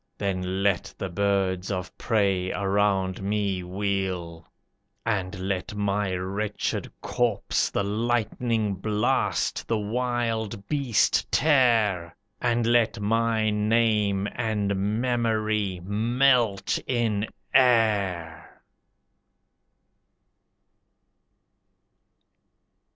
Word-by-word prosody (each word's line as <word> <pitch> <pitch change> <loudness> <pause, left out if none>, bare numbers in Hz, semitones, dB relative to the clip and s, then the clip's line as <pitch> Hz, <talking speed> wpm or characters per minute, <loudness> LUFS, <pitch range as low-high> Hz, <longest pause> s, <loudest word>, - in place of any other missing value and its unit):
Then 95 0 -2
let 100 -3 +1
the 95 - -4
birds 95 0 0
of 95 -2 -4
prey 100 -5 0
around 95 -1 0
me 100 -1 -1
wheel: 90 -3 -3 0.5
And 95 -5 -2
let 95 +1 -3
my 100 -2 0
wretched 100 +3 -3
corpse 115 -5 0
The - - -1
lightning 115 0 0
blast, 105 +2 0
the 115 - +1
wild 115 -2 -2
beast 140 -7 +1
tear; 115 - +3 0.3
And 120 -1 +1
let 115 -1 +2
my 110 +1 +1
name 105 -2 +2
and 105 -4 -1 0.2
memory 110 -5 0
melt 115 +1 +2
in 110 -4 0 0.3
air!" 100 -10 +1
105 Hz, 80 wpm, -26 LUFS, 95-115 Hz, 0.5 s, tear